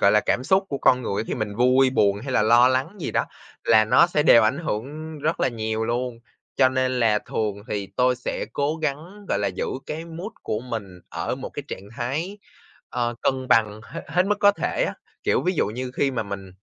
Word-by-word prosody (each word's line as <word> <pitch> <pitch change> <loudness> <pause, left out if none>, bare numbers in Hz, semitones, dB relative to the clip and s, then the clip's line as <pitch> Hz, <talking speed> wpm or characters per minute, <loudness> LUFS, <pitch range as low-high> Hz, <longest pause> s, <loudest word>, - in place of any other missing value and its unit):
gọi 100 - +5
là, 105 - +5
cảm 125 - +1
xúc 190 +6 +3
của 140 - -3
con 125 0 +4
người 115 - -3
á - - 0
khi - - -2
mình 110 -3 -4
vui, 130 +2 +4
buồn, 100 -5 +2
hay 130 +3 -5
là 105 - +3
lo 120 +3 +6
lắng 130 +10 -1
gì - - -3
đó, - - +1 0.4
là 110 -1 +5
nó 110 +10 +5
sẽ 155 -4 +1
đều 120 -6 +7
ảnh 110 +6 +2
hưởng 155 +3 -5
rất 155 +3 -1
là - - +3
nhiều 110 -2 -2
luôn. 120 +1 -2 0.4
Cho 130 - +5
nên 130 -1 0
là 110 -2 +4
thường 105 -1 -2
thì 100 -2 -2
tôi 125 0 +3
sẽ 125 - -4
cố 145 +2 0
gắng, 160 +7 -4
gọi - - +1
là, 100 - 0
giữ 95 - -3 0.2
cái 160 +2 -5
mood 170 +6 -7
của 110 - -2
mình 105 -7 -6
ở - - -3
một - - -7
cái - - -6
trạng 100 +2 -7
thái, 155 +12 -3 0.5
ờ, 120 0 -1
cân 130 -1 0
bằng 110 -1 +3
hê 165 - -5
hết 180 +1 +2
mức 210 +1 +1
có 205 - +7
thể 355 - -1
á. - - -5 0.3
Kiểu, - - +1
ví 185 - +1
dụ - - +1
như 125 +5 -4
khi 140 - +1
mà 130 - -2
mình 100 -2 -7
125 Hz, 235 wpm, -24 LUFS, 110-155 Hz, 0.5 s, đều